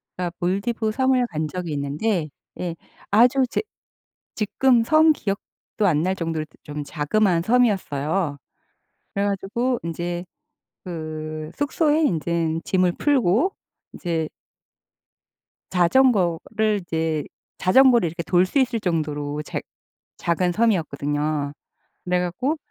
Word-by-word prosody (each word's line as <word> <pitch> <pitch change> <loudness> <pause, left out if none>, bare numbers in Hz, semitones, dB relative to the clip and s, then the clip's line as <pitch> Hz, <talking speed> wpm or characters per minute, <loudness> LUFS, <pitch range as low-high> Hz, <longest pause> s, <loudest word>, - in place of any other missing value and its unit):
그러니까 180 -1 -2
몰디브 215 +5 0
섬을 260 0 +2
간 155 -5 -3
적이 170 -1 -4
있는데 150 +5 -1 0.3
예 175 -2 -3 0.4
아주 245 +5 +5
제 - - 0 0.7
지금 235 +3 +3
섬 310 +5 +5
기억도 200 -8 -3 0.5
안 155 -4 +3
날 185 +2 +1
정도로 165 -3 -2
그 - - -24
좀 150 -1 -5
자그마한 170 +4 +1
섬이었어요. 190 - +1 0.8
그래 200 0 0
가지고 235 +6 -1
인제 175 +1 -3 0.6
그 155 -2 -5
숙소에 300 +2 +2
인제 165 - 0
짐을 185 -2 +2
풀고 275 - +2 0.4
인제 165 -3 -2 1.4
자전거를 205 +1 +2
인제 160 -3 -1 0.3
자전거를 240 0 +5
이렇게 170 +1 -4
돌 180 +2 +3
수 275 - 0
있을 245 -3 +1
정도로 150 -6 -2
작 - - -4 0.6
작은 175 +1 +1
섬이었거든요. 150 -8 0 0.5
그래 180 0 +1
갖고 245 - -1
180 Hz, 245 characters per minute, -23 LUFS, 160-225 Hz, 1.4 s, 아주